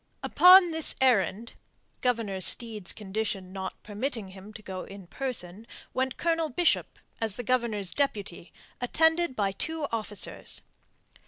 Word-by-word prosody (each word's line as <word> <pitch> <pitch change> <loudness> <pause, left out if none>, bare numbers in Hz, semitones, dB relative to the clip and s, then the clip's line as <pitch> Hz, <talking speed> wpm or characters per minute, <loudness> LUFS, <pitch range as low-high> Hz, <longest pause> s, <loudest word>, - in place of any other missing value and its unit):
Upon 360 -1 +7
this 320 -1 +3
errand 230 -3 +1 0.5
Governor 225 -6 -1
Steed's 215 -2 +3
condition 195 -2 -4
not 190 -1 -6
permitting 215 0 -4
him 190 +2 -12
to 215 - -11
go 185 -2 -6
in 195 -1 -11
person 220 -2 -5 0.3
went 260 0 -1
Colonel 330 -2 0
Bishop 330 +6 +1 0.2
as 220 -3 -1
the 245 - -5
Governor's 225 -6 -1
deputy, 205 -11 -3 0.3
attended 320 +3 +2
by 200 -3 0
two 320 +9 -3
officers. 215 -3 -4
225 Hz, 130 wpm, -28 LUFS, 195-265 Hz, 0.5 s, Upon